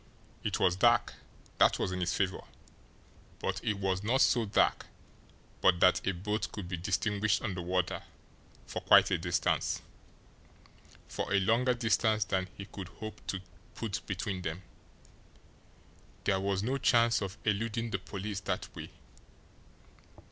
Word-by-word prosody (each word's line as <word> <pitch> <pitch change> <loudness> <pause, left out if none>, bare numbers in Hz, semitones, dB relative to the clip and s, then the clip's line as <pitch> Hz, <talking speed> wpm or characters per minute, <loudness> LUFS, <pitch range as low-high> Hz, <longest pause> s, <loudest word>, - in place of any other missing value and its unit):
It - - -1
was 90 -1 +3
dark 95 - +3 0.5
that - - +5
was - - -1
in 90 - -3
his 85 -2 0
favour 95 -2 0 1.0
but - - -3
it 105 - 0
was 95 -1 -1
not 120 +6 +2
so 120 -2 +4
dark 100 - +2 0.7
but 90 -2 +4
that 90 +1 +4
a - - +4
boat 105 +4 -3
could 100 -4 -6
be 90 - -3
distinguished 100 +4 0
on 105 -5 -2
the 90 - -4
water 90 0 -1 0.6
for - - -5
quite - - +6
a - - +2
distance, - - 0 1.2
for - - -4
a 100 - +4
longer 120 +6 +2
distance 110 -2 +2
than 95 -1 -1
he 100 - -6
could 95 -2 -8
hope 110 +3 -9
to 95 - -3 0.3
put 110 -4 -3
between 95 -1 -3
them. 85 +2 -4 1.6
There 95 -1 +2
was 95 0 -1
no 130 +4 -1
chance 115 -3 +4
of 95 +1 -4
eluding 115 +2 -1
the 100 - -1
police 100 +1 -5
that 95 - -4
way! - - -7
100 Hz, 150 wpm, -31 LUFS, 95-110 Hz, 1.6 s, quite